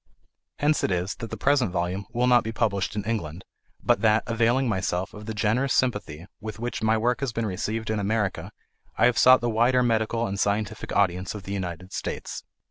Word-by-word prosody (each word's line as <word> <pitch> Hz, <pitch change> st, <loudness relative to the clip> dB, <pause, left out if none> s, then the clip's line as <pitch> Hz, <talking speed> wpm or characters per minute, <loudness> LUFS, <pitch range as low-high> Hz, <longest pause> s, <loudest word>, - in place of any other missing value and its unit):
Hence 150 Hz, +1 st, +1 dB
it -, -, +2 dB
is 90 Hz, +1 st, -1 dB
that 115 Hz, -, -6 dB
the 110 Hz, -, -6 dB
present 135 Hz, -1 st, +2 dB
volume 90 Hz, +2 st, -2 dB
will 120 Hz, +1 st, +1 dB
not 125 Hz, -1 st, +5 dB
be 110 Hz, -, -3 dB
published 105 Hz, -4 st, -1 dB
in 105 Hz, -, -2 dB
England, 95 Hz, -6 st, -4 dB, 0.4 s
but -, -, +2 dB
that, 110 Hz, -1 st, +3 dB
availing 120 Hz, +3 st, +2 dB
myself 95 Hz, -3 st, -1 dB
of 105 Hz, +1 st, -10 dB
the 110 Hz, -, -3 dB
generous 115 Hz, +6 st, +1 dB
sympathy 105 Hz, -, -1 dB
with 110 Hz, 0 st, -7 dB
which 120 Hz, +2 st, -4 dB
my 110 Hz, 0 st, +3 dB
work 120 Hz, +3 st, +1 dB
has 135 Hz, -3 st, -2 dB
been 115 Hz, 0 st, -2 dB
received 110 Hz, +3 st, -3 dB
in 110 Hz, -, 0 dB
America, 105 Hz, -1 st, -1 dB, 0.5 s
I -, -, +4 dB
have 125 Hz, -1 st, +3 dB
sought 130 Hz, 0 st, +7 dB
the 120 Hz, -, 0 dB
wider 125 Hz, +3 st, +3 dB
medical 115 Hz, 0 st, +1 dB
and 100 Hz, -2 st, -3 dB
scientific 105 Hz, +1 st, -1 dB
audience 95 Hz, 0 st, 0 dB
of 105 Hz, -, -7 dB
the 100 Hz, -, -5 dB
United 90 Hz, -1 st, -5 dB
States. -, -, -5 dB
110 Hz, 205 wpm, -25 LUFS, 100-120 Hz, 0.5 s, sought